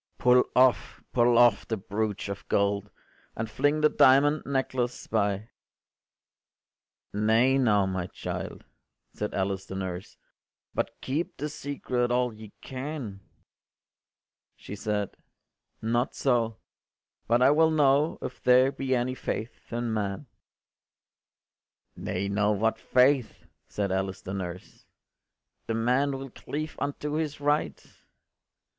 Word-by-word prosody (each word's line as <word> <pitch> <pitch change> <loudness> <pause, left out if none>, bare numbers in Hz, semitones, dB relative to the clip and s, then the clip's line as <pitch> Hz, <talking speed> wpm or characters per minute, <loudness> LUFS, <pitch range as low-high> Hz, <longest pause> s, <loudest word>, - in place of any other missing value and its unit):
Pull 125 0 +5
off, 130 -1 +3
pull 120 -1 +4
off, 120 -3 +5
the 110 - -1
broach 105 +1 -3
of 100 0 -6
gold, 100 0 +1 0.5
And 110 - -3
fling 145 +7 +1
the 150 - +5
diamond 145 +3 +5
necklace 130 -3 -1
by.” 105 0 -1 1.6
“Nay 110 +6 +3
now, 105 -6 +3
my 95 -2 -2
child,” - - -6 0.5
said 105 - -4
Alice 95 0 -2
the 95 - -6
nurse, 95 -1 -5 0.6
“But - - -3
keep 150 +6 -3
the 150 +3 -3
secret 130 -4 -2
all 125 -1 +1
ye 110 -1 -12
can.” 130 -6 -6 1.4
She 100 - -8
said, 105 -1 -2 0.7
“Not 120 +3 0
so: 115 -4 +1 0.7
but 120 +2 +3
I 135 - +7
will 160 +2 +5
know 150 0 +3
If 125 - -6
there 125 +2 +5
be 135 -1 -1
any 125 +1 0
faith 115 -2 -5
in 120 -1 -2
man”. 100 +4 -2 1.7
“Nay 95 +2 -3
now, 105 +1 +2
what 110 +2 0
faith?” 130 0 +2 0.2
said 100 -2 -2
Alice 95 0 -2
the 95 - -5
nurse, 90 -2 -7 0.8
“The 115 - -1
man 130 +5 +1
will 135 -1 -8
cleave 155 +5 -5
unto 145 +1 -3
his 155 -2 -2
right. 145 - 0
120 Hz, 125 wpm, -27 LUFS, 100-135 Hz, 1.7 s, I